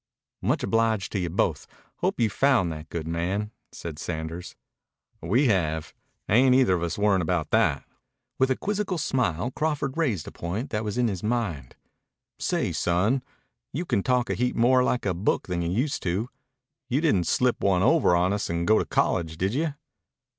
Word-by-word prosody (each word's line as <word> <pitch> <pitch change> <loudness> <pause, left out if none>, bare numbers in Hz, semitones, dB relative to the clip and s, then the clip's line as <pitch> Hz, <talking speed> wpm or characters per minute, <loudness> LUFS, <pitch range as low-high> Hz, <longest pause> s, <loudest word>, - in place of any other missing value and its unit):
"Much - - 0
obliged 115 -3 +1
to 100 - -1
you 90 -2 -2
both. 85 - -1 0.3
Hope - - -1
you've 115 -3 +2
found 130 -11 +3
that 75 0 -8
good 80 -2 -4
man," 90 +6 -2 0.2
said 80 -3 -7
Sanders. 80 +1 -5 0.7
"We 115 - +2
have. 80 -8 0 0.3
Ain't 125 +4 +5
either 130 -8 +4
of 90 - 0
us 85 -1 -2
worryin' 100 -2 +3
about 85 -2 -1
that." - - +2 0.5
With 130 0 +3
a 130 - +2
quizzical 205 0 -2
smile 125 - 0
Crawford 150 -2 -1
raised 125 - -1
a - - -7
point 100 +11 -4
that 105 0 -1
was 105 +1 -3
in 125 -1 +3
his 95 -5 -3
mind. 105 - -2 0.6
"Say, - - 0
son, 100 +10 +1 0.5
you 170 +6 -2
talk 125 - +1
a - - +2
heap 125 +1 -1
more 125 +2 +4
like 125 -2 0
a 95 - +1
book 90 +5 0
than 90 -2 -2
you 85 - -1
used 125 - -1
to. 95 +7 -1 0.6
You 130 +2 +2
didn't 120 - +2
slip 125 -1 +1
one 95 -2 +2
over 135 - +4
on 90 +3 +2
us 105 - -2
and 85 0 -1
go 110 +3 +4
to - - -1
college, 80 -2 0
did 95 +5 0
you?" 150 +1 -1
105 Hz, 180 wpm, -26 LUFS, 85-125 Hz, 0.7 s, Ain't